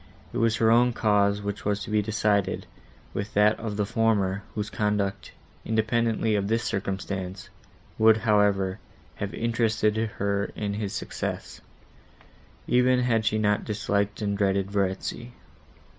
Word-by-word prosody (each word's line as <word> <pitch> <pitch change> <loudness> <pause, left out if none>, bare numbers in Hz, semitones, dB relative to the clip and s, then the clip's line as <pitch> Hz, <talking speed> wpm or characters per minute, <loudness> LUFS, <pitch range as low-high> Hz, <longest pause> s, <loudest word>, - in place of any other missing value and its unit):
It - - -1
was 115 0 +3
her 115 0 +3
own 120 +1 +4
cause 105 -2 +2
which 100 0 -4
was 105 0 -1
to - - -7
be 105 0 +3
decided 105 -2 0 0.5
with 100 +1 -4
that 105 +1 +4
of 110 -2 -4
the 105 - +1
former, 100 -3 +1
whose 105 -1 -3
conduct, 105 -2 -1 0.3
independently 115 0 +1
of 100 -1 0
this 115 +2 0
circumstance, 95 -2 -4 0.5
would, 110 0 +6
however, 105 -3 +2 0.4
have 100 -1 -3
interested 115 -2 +1 0.2
her 100 0 0
in 105 -1 -2
his 105 -1 -3
success, - - -5 1.0
even 125 +1 +3
had 115 -3 +1
she 110 - +2
not 105 -1 +1
disliked 105 0 -1
and 100 -1 0
dreaded 100 -1 0
Verezzi. 100 +4 -2
105 Hz, 140 wpm, -26 LUFS, 100-110 Hz, 1.0 s, would